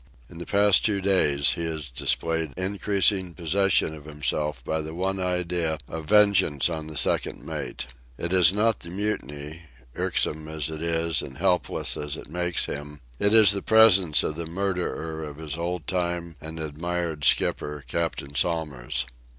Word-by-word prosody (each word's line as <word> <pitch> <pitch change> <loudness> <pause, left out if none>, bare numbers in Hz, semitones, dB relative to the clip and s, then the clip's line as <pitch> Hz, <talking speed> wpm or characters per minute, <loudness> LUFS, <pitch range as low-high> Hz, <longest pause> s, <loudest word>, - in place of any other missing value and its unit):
In 85 - -11
the 85 - -7
past 100 -1 +5
two 105 -3 +1
days 75 -8 +3
he 85 - -4
has 80 -3 -4
displayed 80 +4 -1
increasing 95 -1 0
possession 95 -1 +1
of 75 -2 -11
himself 75 -2 -2
by 80 0 -1
the 80 +1 -7
one 95 +2 -1
idea 90 -3 0
of 80 -1 -6
vengeance 100 -8 +4
on 80 -2 -4
the 80 -2 -6
second - - 0
mate. - - -5 0.3
It 85 +2 -3
is 90 -2 +7
not 105 +2 +1
the 85 - -9
mutiny, 80 -6 -4 0.3
irksome 75 0 0
as 80 0 -3
it 80 0 -6
is 85 -1 +1
and 65 - -9
helpless 90 0 0
as 75 -1 -3
it - - -10
makes 90 0 0
him; 75 0 -6 0.2
it 100 - +2
is 110 -2 +7
the 100 -1 0
presence 100 -8 +5
of 75 - -3
the 85 -1 -4
murderer 85 -3 -3
of 75 -1 -8
his 80 -2 -5
old 85 -1 -4
time 85 -2 -2
and 80 +1 -8
admired 80 0 -3
skipper, 75 0 +2
Captain 80 -4 -3
Somers. 70 -7 0
85 Hz, 165 wpm, -25 LUFS, 75-95 Hz, 0.3 s, is